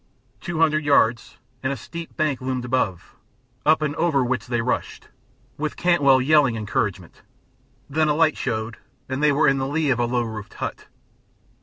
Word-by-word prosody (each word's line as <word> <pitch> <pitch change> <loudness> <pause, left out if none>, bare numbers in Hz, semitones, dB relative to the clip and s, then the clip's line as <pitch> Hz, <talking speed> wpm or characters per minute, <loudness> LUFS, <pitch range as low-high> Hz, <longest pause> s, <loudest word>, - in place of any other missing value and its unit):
Two 175 -3 -5
hundred 155 -1 +2
yards, 120 -5 +2 0.2
and 130 - -1
a 140 - -3
steep 165 +8 -9
bank 150 -5 0
loomed 130 -1 -3
above, 120 -8 -2 0.5
up 155 0 +4
and 150 -1 -1
over 155 -6 +2
which 125 -4 -2
they 120 -1 -1
rushed, 115 +2 -3 0.5
with 155 0 -3
Cantwell 145 -7 +4
yelling 140 -2 +3
encouragement; 105 -4 -3 0.7
then 155 +2 +1
a 150 - +2
light 160 -1 +3
showed, 110 -2 -3 0.3
and 130 +2 -3
they 150 -1 +4
were 145 +2 +3
in 135 0 +3
the 135 - -1
lee 150 0 0
of 120 - 0
a 120 - +2
low 120 0 0
roofed 110 -3 -7
hut. - - -6
135 Hz, 175 wpm, -23 LUFS, 120-155 Hz, 0.7 s, up